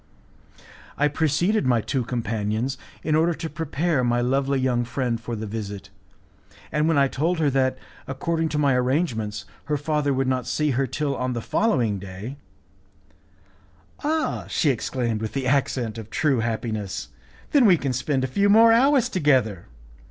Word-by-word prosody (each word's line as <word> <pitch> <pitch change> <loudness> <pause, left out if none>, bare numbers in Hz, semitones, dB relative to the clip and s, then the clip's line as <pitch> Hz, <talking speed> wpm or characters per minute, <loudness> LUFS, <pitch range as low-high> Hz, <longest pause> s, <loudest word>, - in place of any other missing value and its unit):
I 150 - +3
preceded 160 +4 +1
my 120 -2 +3
two 120 +4 -1
companions 115 +1 -2 0.3
in 155 - 0
order 165 +2 +3
to 165 - -5
prepare 155 -1 -1
my 120 0 +2
lovely 135 +2 +1
young 125 -2 +1
friend 120 -1 -2
for 120 0 -4
the 110 0 -5
visit, 105 -2 -6 0.8
and 150 +1 +1
when 165 -2 +2
I 140 -1 +5
told 165 +7 -1
her 150 -3 +2
that, 130 -1 +1 0.3
according 160 +4 -1
to 155 - -2
my 140 -2 +3
arrangements, 125 - -1 0.2
her 150 0 0
father 150 0 0
would 135 0 0
not 130 -2 -1
see 150 -1 0
her 135 +1 0
till 145 +2 -2
on 125 -1 -2
the 120 - -2
following 115 - +1
day: 100 +8 -8 1.7
"Ah!" 310 +1 -1
she 150 - +2
exclaimed 120 -2 -2
with 110 - -4
the 135 -2 -2
accent 125 -4 0
of 110 -1 -9
true 145 -3 +1
happiness, 110 - -3 0.4
"then 275 -6 +5
we 180 -3 +6
can 140 -4 -2
spend 130 +1 -1
a 130 -1 -3
few 200 0 +3
more 225 +2 +7
hours 265 +2 +4
together! 130 - +1
130 Hz, 165 wpm, -24 LUFS, 115-155 Hz, 1.7 s, more